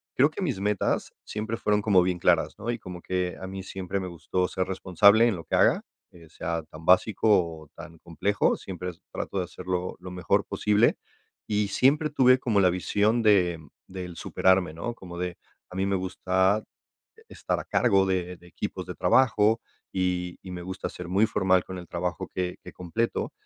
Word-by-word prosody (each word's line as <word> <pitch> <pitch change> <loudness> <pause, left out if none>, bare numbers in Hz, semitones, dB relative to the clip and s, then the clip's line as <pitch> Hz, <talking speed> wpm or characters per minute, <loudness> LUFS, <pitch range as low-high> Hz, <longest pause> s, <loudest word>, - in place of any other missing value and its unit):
creo 140 +3 +5
que 155 - -7
mis 135 - -1
metas 105 -1 0
siempre 110 +2 -4
fueron 105 0 +1
como 100 -3 +4
bien 90 0 0
claras, - - +2
¿no?, 115 - -5
y 120 - -4
como 90 -3 -9
que 90 0 -2
a 95 - -5
mí 95 0 -6
siempre 95 0 -4
me 95 - -4
gustó 90 +2 -2
ser 95 0 -2
responsable 100 +4 +4
en 110 - +1
lo 85 - -8
que - - -2
haga, - - +4 0.3
eh, 85 -2 -16
sea 80 +1 -3
tan 80 +1 -13
básico 95 +4 +3 0.4
o 75 - -19
tan 80 +1 -11
complejo, 85 +6 0
siempre 90 -1 -6
es 85 - -21
trato 100 - -3
de 90 - -1
hacerlo 90 0 -4
lo 90 0 -9
mejor 90 +3 0
posible. 105 +2 +2 0.5
Y 105 -1 +1
siempre 150 +8 +3
tuve 130 -2 +5
como 110 -5 +1
la 90 - +5
visión 105 +6 +1
de 90 -6 +3 0.3
del 90 -2 -7
superarme, 95 -2 +2
¿no?, 85 +9 -4
como 90 -6 -10
de, 90 0 -3 0.3
a 90 - -11
mí 95 +1 0
me 100 0 +1
gusta, 95 +2 +1 0.5
e 450 - -19
estar - - -3
a - - -7
cargo 100 -5 +3
de 90 -1 -1
de 90 - -19
equipos - - -5
de - - -6
trabajo, 110 -3 +3 0.3
y 90 -1 -1
y 95 - -9
me 90 -1 -6
gusta 95 +1 -5
ser 90 -1 -8
muy 100 +4 +3
formal 95 -3 +2
con 95 -1 -7
el 90 - -9
trabajo 90 +1 -3
que 90 -1 -2
que - - -9
completo. 100 +7 -2
95 Hz, 195 wpm, -26 LUFS, 90-105 Hz, 0.5 s, creo